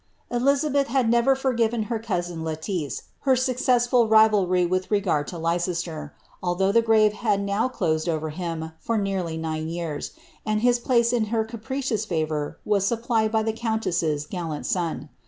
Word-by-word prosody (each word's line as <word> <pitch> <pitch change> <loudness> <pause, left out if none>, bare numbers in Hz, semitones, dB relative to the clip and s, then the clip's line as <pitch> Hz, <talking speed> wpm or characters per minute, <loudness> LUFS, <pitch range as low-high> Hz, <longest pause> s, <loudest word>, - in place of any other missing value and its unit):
EliKabeth 280 +3 +2
had 260 -1 +1
never 235 +3 +4
forgiven 235 -4 0
nti 225 0 -3
luusui 175 -4 -2
Letiice 160 0 -3 0.2
her 270 - +3
successfid 250 -2 +2
rinlty 205 -5 +4
wilh 185 +1 -1
regard 190 -8 0
lo 175 - -6
Leicester, 165 -2 -2 0.3
allhough 185 +2 +1
the 230 - +5
grave 220 -2 +4
had 210 -2 0
now 200 +4 0
closed 160 -9 -1
ovei 155 -2 -2
liiia 160 -2 -4
for 230 - -1
neiirly 190 -5 -2
nine 160 0 -3
yeurs, 165 -3 -4 0.3
and 215 -1 0
his 245 0 +3
place 235 -1 +2
iu 230 -3 +2
her 220 0 0
capricious 230 0 -3
favour 155 -5 -2
was 205 -2 +2
supplied 225 0 +1
by 220 -1 +2
the 220 0 -1
countess's 180 -10 -1
gallant 165 -3 -5
son. 165 -4 -2
205 Hz, 155 wpm, -24 LUFS, 170-230 Hz, 0.3 s, the